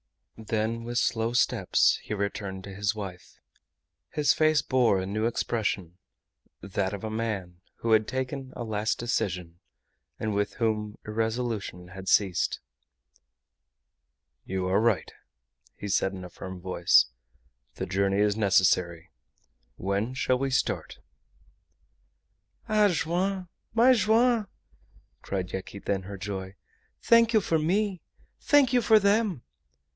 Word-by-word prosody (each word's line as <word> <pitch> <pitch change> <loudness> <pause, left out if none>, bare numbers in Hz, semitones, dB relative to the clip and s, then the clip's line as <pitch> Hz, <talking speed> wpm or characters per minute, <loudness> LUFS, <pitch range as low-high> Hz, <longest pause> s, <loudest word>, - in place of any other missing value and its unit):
Then 110 +1 -2
with 120 +1 -4
slow 115 0 +1
steps 120 - +3
he 105 - -4
returned 100 -1 -4
to 100 - -8
his 100 +1 -1
wife. 95 -4 -8 0.7
His 150 -1 +2
face 155 -1 +3
bore 120 -7 +3
a 95 - -3
new 110 +4 -1
expression, 100 -7 -2 0.6
that 100 0 -2
of 100 - -10
a 110 - -3
man 100 -6 -4
who 115 - -2
had 110 -1 +4
taken 130 +1 -4
a 120 - -4
last 110 -1 -1
decision, 90 -7 -2 0.6
and 110 -1 -2
with 100 0 -1
whom 105 -2 -1
irresolution 110 -4 -3
had 95 +1 -10
ceased. 95 -4 +2 1.8
"You 95 0 -3
are 95 +3 +2
right," 115 -4 +1 0.6
he 105 - -7
said, 95 -1 +1
in 95 -1 -7
a - - -9
firm 95 -1 -8
voice. 90 -1 +4 0.7
"The 95 - -3
journey 95 +1 0
is 105 -1 +2
necessary. 90 -5 +2 0.6
When 100 +6 -2
shall 130 -1 +1
we 135 0 0
start?" 135 - -1 1.7
"Ah! 215 -1 +4
Joam! 180 +1 -1 0.3
my 245 +3 +6
Joam!" 230 0 +3 0.7
cried 95 -2 -4
Yaquita, 95 +1 -3
in 95 - -2
her 100 +1 -7
joy. 95 0 -5 0.5
"Thank 230 -1 +5
you 215 - +5
for 165 -3 +1
me! 190 +3 0 0.4
Thank 285 -4 +4
you 245 - +4
for 220 -1 +6
them!" 200 - +2
110 Hz, 130 wpm, -27 LUFS, 95-135 Hz, 1.8 s, my